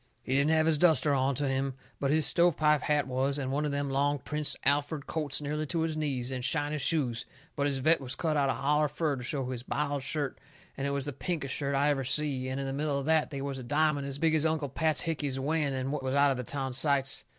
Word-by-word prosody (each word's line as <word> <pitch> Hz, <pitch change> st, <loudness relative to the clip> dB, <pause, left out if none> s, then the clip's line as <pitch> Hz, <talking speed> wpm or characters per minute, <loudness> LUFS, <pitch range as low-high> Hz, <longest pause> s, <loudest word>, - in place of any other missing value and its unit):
He 130 Hz, -, -2 dB
didn't 140 Hz, +3 st, +3 dB
have 160 Hz, 0 st, +3 dB
his 160 Hz, -2 st, +2 dB
duster 160 Hz, -3 st, +4 dB
onto 135 Hz, +1 st, +1 dB
him, 135 Hz, 0 st, -1 dB, 0.2 s
but 140 Hz, -, 0 dB
his 155 Hz, +1 st, +3 dB
stove 170 Hz, -2 st, +3 dB
pipe 150 Hz, -1 st, +3 dB
hat 150 Hz, -1 st, +1 dB
was, 135 Hz, +2 st, 0 dB
and 135 Hz, -2 st, -3 dB
one 145 Hz, +2 st, 0 dB
of 150 Hz, -, -1 dB
them 140 Hz, -1 st, -2 dB
long 145 Hz, +2 st, +1 dB
Prince 150 Hz, +2 st, -1 dB
Alferd 145 Hz, +1 st, +1 dB
coats 150 Hz, -4 st, -2 dB
nearly 150 Hz, +1 st, -2 dB
to 165 Hz, +2 st, -1 dB
his 160 Hz, -1 st, -1 dB
knees, 135 Hz, -5 st, -2 dB
and 130 Hz, -1 st, -4 dB
shiny 145 Hz, +3 st, 0 dB
shoes, 130 Hz, -6 st, 0 dB, 0.3 s
but 145 Hz, -1 st, 0 dB
his 140 Hz, -2 st, 0 dB
vest 160 Hz, +5 st, +3 dB
was 125 Hz, -1 st, -3 dB
cut 160 Hz, -2 st, -1 dB
out 140 Hz, -2 st, +2 dB
holler 150 Hz, +3 st, +1 dB
fur 150 Hz, 0 st, -1 dB
to 125 Hz, -, -7 dB
show 130 Hz, 0 st, -3 dB
his 125 Hz, -2 st, -4 dB
biled 145 Hz, +2 st, -2 dB
shirt, 140 Hz, 0 st, -3 dB, 0.4 s
and 140 Hz, 0 st, -2 dB
it -, -, 0 dB
was 140 Hz, -1 st, -2 dB
the 145 Hz, -, -4 dB
pinkest 145 Hz, -1 st, -3 dB
shirt 140 Hz, -1 st, -2 dB
I 140 Hz, +2 st, +2 dB
ever 135 Hz, -2 st, -1 dB
see, 130 Hz, -1 st, +1 dB
and 130 Hz, +1 st, -3 dB
in 135 Hz, -, -3 dB
the 135 Hz, -, -3 dB
middle 145 Hz, 0 st, -1 dB
of 140 Hz, -, -3 dB
that 160 Hz, 0 st, +2 dB
they 140 Hz, -1 st, -5 dB
was 140 Hz, -1 st, -4 dB
a -, -, -7 dB
diamond 145 Hz, +2 st, +1 dB
as 140 Hz, 0 st, -4 dB
big 160 Hz, +1 st, +2 dB
as 155 Hz, -1 st, +3 dB
Uncle 160 Hz, -3 st, 0 dB
Pat 155 Hz, +3 st, +1 dB
Hickey's 145 Hz, -5 st, -2 dB
wen, 140 Hz, -2 st, -1 dB
what 150 Hz, -1 st, -2 dB
was 130 Hz, +1 st, -2 dB
one 140 Hz, 0 st, +4 dB
of 135 Hz, -, -1 dB
the 125 Hz, -, -3 dB
town 135 Hz, +1 st, -3 dB
sights. 135 Hz, 0 st, +3 dB
140 Hz, 255 wpm, -29 LUFS, 135-150 Hz, 0.4 s, duster